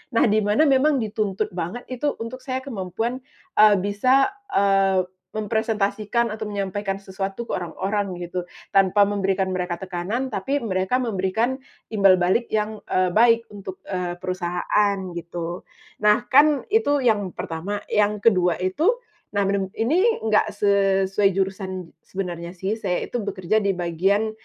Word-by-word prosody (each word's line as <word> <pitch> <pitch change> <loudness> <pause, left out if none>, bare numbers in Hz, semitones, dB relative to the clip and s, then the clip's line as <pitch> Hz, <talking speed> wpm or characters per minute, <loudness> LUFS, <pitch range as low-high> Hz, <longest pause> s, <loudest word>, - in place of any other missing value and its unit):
Nah, - - +5
di 215 +1 +3
mana 210 +8 +3
memang 275 -2 +3
dituntut 210 -3 -2
banget 180 +7 -4
itu 280 +3 -1
untuk 230 +3 -7
saya 260 -1 -2
kemampuan, 225 +1 -3 0.4
eee, 210 -1 +8
bisa, 255 +8 +3 0.2
eee, 195 -1 +3 0.3
mempresentasikan 215 +1 0
atau 215 -1 -5
menyampaikan 195 0 -2
sesuatu 195 +3 -4
ke - - -7
orang-orang 190 +2 -2
gitu, 175 0 -5 0.3
tanpa 195 +1 +5
memberikan 195 -2 0
mereka 180 -1 -2
tekanan, 190 +8 -3
tapi 270 +9 -1
mereka 190 +3 0
memberikan 225 +5 -1 0.3
imbal 195 -3 +6
balik 185 +7 +1
yang, 215 0 -1
eee, 185 -1 +2
baik 230 +1 +5
untuk, 190 -2 -8
eee, 180 -2 -3
perusahaan 185 +3 0 0.2
gitu. 170 +1 -5 0.4
Nah, 210 +3 +4
kan 290 +1 +5
itu 290 - +3
yang 205 -5 +2
pertama, 190 +6 -4
yang 210 0 +2
kedua 180 -6 +4
itu, 310 - +1 0.4
nah 200 - +3
beneb 195 -1 0
ini 360 - +2
nggak 210 -1 +2
sesuai 195 0 +3
jurusan 190 -2 -3 0.2
sebenarnya 175 -2 -5
sih, 190 +4 -1
saya 180 - -1
itu 245 - -4
bekerja 200 +1 0
di 200 -2 0
bagian, 190 +6 +1
200 Hz, 140 wpm, -23 LUFS, 185-225 Hz, 0.4 s, eee